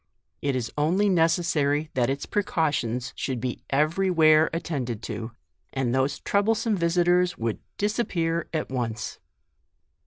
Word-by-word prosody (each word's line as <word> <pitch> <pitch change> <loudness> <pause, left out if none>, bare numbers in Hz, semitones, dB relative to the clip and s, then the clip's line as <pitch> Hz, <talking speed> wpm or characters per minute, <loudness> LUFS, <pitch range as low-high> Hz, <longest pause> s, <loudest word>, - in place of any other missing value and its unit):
It 140 -2 0
is 125 -3 -2
only 185 +7 +2
necessary 160 -4 +2
that 125 -1 +1
its 140 +1 -2
precautions 145 - -1
should 130 -2 -3
be 125 +1 -4
every 155 +7 +2
where 155 -2 +5
attended 135 -9 -3
to, 115 +1 -5 0.4
and 130 -3 0
those 135 +2 +1
troublesome 220 +2 +1
visitors 175 0 +2
would 115 -1 -2 0.2
disappear 170 -6 0
at 155 -5 -3
once. 120 -3 -3
155 Hz, 125 wpm, -26 LUFS, 130-175 Hz, 0.4 s, where